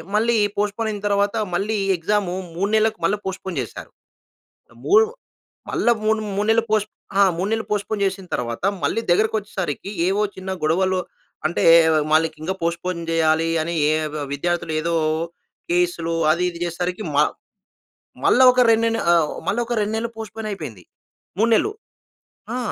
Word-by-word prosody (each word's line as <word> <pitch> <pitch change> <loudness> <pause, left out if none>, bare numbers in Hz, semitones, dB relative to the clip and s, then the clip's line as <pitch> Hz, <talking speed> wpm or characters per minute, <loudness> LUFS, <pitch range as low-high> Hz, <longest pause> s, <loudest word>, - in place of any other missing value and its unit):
మళ్ళీ 230 +2 +3 0.2
పోస్ట్‌పోన్ 210 +2 -1
అయిన 205 - -6
తర్వాత, 200 0 +1 0.2
మళ్ళీ 210 +4 0 0.2
ఎగ్జాము 185 +1 0 0.2
3 200 +4 -1
నెలలకు 220 0 +1
మళ్ళీ 205 +1 +1
పోస్ట్‌పోన్ 190 -1 -4
చేశారు. - - -10 1.0
3 425 +2 +6 0.6
మళ్ళా 240 - +2
3 210 -2 0
నెలలు 225 0 +4
పోస్ట్ 215 -1 +1 0.3
ఆ! - - +7
3 185 +4 -2
నెలలు 225 0 -1
పోస్ట్‌పోన్ 205 0 -1
చేసిన 190 0 -3
తర్వాత, 120 +1 -3 0.2
మళ్ళీ 145 +10 +1
దగ్గరకొచ్చేసరికి, 195 -3 0 0.2
ఏవో 195 +2 +1
చిన్న 190 0 -6
గొడవలు 185 +4 +2 0.5
అంటే, 170 - -2 0.3
ఆహ్, 155 -1 +2
మళ్ళీ 160 +1 +4 0.2
ఇంకా 185 +4 -1
పోస్ట్‌పోన్ 170 +1 -2
చేయాలి 160 0 +2
అని, 170 +2 -3 0.2
ఏ - - +3 0.4
విద్యార్థులు 170 +2 -2
ఏదో 170 +1 -1 0.8
కేసులు, 175 -1 0 0.2
అది, 170 +3 +1
ఇది, 170 - -10
చేసేసరికి 180 +4 -3
మా - - +5 1.0
మళ్ళా 260 - +5
ఒక 250 - +2
2 225 0 +3
నెల్ 230 0 -1
ఆహ్ 160 -3 +2 0.2
మళ్ళా 220 +5 +1
ఒక 240 0 -2
2 210 +1 -2
నెలలు 230 +1 -3
పోస్ట్‌పోన్ 220 0 -6
అయిపోయింది. 110 - -7 0.5
3 225 +2 +3
నెల్లు. 415 - +2 0.8
ఆ! - - -1
195 Hz, 150 wpm, -22 LUFS, 170-215 Hz, 1.0 s, ఆ